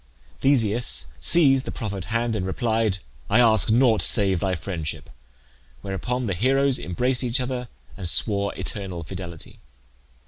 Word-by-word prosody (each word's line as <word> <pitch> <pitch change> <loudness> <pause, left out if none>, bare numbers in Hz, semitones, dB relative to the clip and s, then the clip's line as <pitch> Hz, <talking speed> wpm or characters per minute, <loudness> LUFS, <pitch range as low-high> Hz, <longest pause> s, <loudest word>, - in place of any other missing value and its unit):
Theseus 115 - +3
seized 135 - +3
the - - -5
proffered 100 -6 -6
hand 115 +2 -1
and 100 - -2
replied, 110 +1 -1 0.3
"I 110 - +3
ask 110 -4 +4
nought 115 -1 +3
save 95 -5 +2
thy 95 0 -1
friendship;" 80 -2 -5 0.7
whereupon 120 +6 -3
the 100 - -2
heroes 135 +7 +1
embraced 125 +9 0
each 125 +2 +1
other 125 -1 -4 0.3
and 90 -3 -2
swore 100 +1 +2
eternal 95 -5 -4
fidelity. 85 -1 -9
110 Hz, 135 wpm, -23 LUFS, 95-125 Hz, 0.7 s, ask